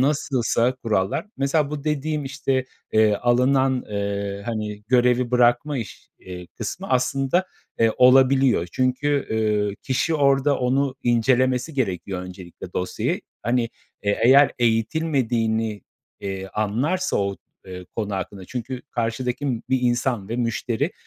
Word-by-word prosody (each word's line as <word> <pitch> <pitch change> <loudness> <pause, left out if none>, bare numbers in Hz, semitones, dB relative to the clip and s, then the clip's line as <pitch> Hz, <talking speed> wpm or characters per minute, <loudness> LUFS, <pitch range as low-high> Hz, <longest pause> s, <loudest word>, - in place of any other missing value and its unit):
nasılsa 130 -3 +1
kurallar 105 - -1
Mesela 140 +1 +1
bu 150 -1 -5
dediğim, 150 0 -1
işte, 135 -1 -1 0.3
eee, 110 -1 +4
alınan, 130 +3 +2
eee, 100 -1 -3
hani, 105 -2 -4
görevi 125 0 +3
bırakma 125 +4 +3
iş 100 -6 -8
eee, 90 -1 -9
kısmı 175 - -5
aslında, 135 +7 +1 0.3
eee, 115 0 +4
olabiliyor 130 -5 +5
çünkü, 135 +3 0
eee, 105 -2 0
kişi 140 +5 0
orada 140 -1 +3
onu 130 +2 +1
incelemesi 125 +4 +2
gerekiyor 95 -6 -2
öncelikle 90 -1 -10
dosyayı. 90 - -2 0.2
Hani, 120 +2 +1 0.4
eee, 100 -1 0
eğer 135 +3 +6
eğitilmediğini, 115 -3 0 0.4
eee, 95 -1 -4
anlarsa 135 - -1
o, 100 -1 -1 0.3
eee, 90 -1 -8
konu 105 -3 -2
hakkında 95 0 -5
Çünkü 125 +3 -5
karşıdaki 120 +4 -2 0.2
bir 130 - +2
insan 120 -4 0
ve 115 - -3
müşteri, 120 - -1
125 Hz, 120 wpm, -23 LUFS, 105-135 Hz, 0.4 s, eğer